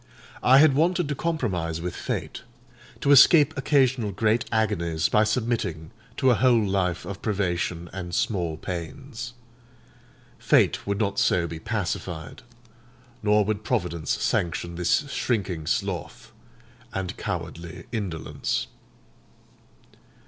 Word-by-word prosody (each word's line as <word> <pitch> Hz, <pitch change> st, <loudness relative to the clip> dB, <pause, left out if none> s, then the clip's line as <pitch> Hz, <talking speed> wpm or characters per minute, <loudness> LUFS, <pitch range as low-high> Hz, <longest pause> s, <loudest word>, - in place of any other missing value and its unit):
I 130 Hz, +2 st, +6 dB
had 145 Hz, 0 st, +6 dB
wanted 175 Hz, +3 st, +2 dB
to -, -, 0 dB
compromise 105 Hz, -, -2 dB
with 90 Hz, +1 st, -4 dB
Fate: -, -, -4 dB, 0.6 s
to 140 Hz, -, +2 dB
escape 150 Hz, +2 st, +7 dB
occasional 135 Hz, -6 st, +2 dB
great 110 Hz, +5 st, +1 dB
agonies 85 Hz, -8 st, 0 dB
by 105 Hz, -, +4 dB
submitting 110 Hz, -8 st, -1 dB, 0.3 s
to 130 Hz, -2 st, +4 dB
a -, -, +5 dB
whole 120 Hz, -2 st, +3 dB
life 95 Hz, -3 st, -1 dB
of 100 Hz, 0 st, -7 dB
privation 90 Hz, -4 st, -1 dB
and 90 Hz, -2 st, -5 dB
small 85 Hz, -7 st, -1 dB
pains. 115 Hz, -, -6 dB, 1.1 s
Fate -, -, +2 dB
would 100 Hz, 0 st, 0 dB
not 100 Hz, -2 st, 0 dB
so 85 Hz, -1 st, +2 dB
be 80 Hz, -1 st, -6 dB
pacified; 90 Hz, -5 st, -4 dB, 0.8 s
nor 105 Hz, -1 st, +3 dB
would 110 Hz, 0 st, -2 dB
Providence 90 Hz, -10 st, -2 dB
sanction 85 Hz, 0 st, -1 dB
this 90 Hz, -, +1 dB
shrinking 95 Hz, -9 st, -2 dB
sloth -, -, -3 dB, 0.6 s
and 95 Hz, +1 st, -4 dB
cowardly 85 Hz, -3 st, -6 dB
indolence. 90 Hz, -, -3 dB
100 Hz, 115 wpm, -25 LUFS, 85-120 Hz, 1.1 s, escape